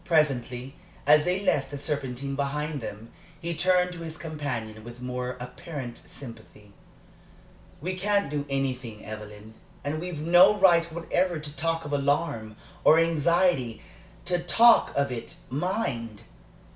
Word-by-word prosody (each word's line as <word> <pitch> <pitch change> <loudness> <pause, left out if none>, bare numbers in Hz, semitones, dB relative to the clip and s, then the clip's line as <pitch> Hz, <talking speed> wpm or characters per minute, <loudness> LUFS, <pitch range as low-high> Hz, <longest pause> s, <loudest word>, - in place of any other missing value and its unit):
Presently, 135 -6 +1 0.3
as 150 +1 +6
they 180 +2 +1
left 140 -8 +1
the 145 - -5
Serpentine 140 -2 -3
behind 145 +1 -2
them, 110 +1 -8 0.3
he 170 0 -3
turned 180 +2 +3
to 175 - -9
his 160 -1 -6
companion 135 -9 -5
with 120 +1 -10
more 125 0 -4
apparent 125 0 -7
sympathy. 110 -5 -12 1.1
"We 180 +5 -2
can't 200 +1 +1
do 145 -1 -2
anything, 130 -5 -3
Evelyn, 105 0 -9 0.3
and 155 +2 -2
we've 175 -3 -5
no 175 +6 +6
right 170 -4 +5
whatever 175 +1 0
to 150 -1 -7
talk 165 0 -1
of 145 - -5
alarm, 140 -6 0 0.3
or 155 - +7
anxiety 165 -6 +2 0.4
to 175 0 0
talk 230 +7 +5
of 140 -1 +1
it, 115 -2 -6 0.2
mind! 135 - -2
145 Hz, 135 wpm, -27 LUFS, 125-170 Hz, 1.1 s, or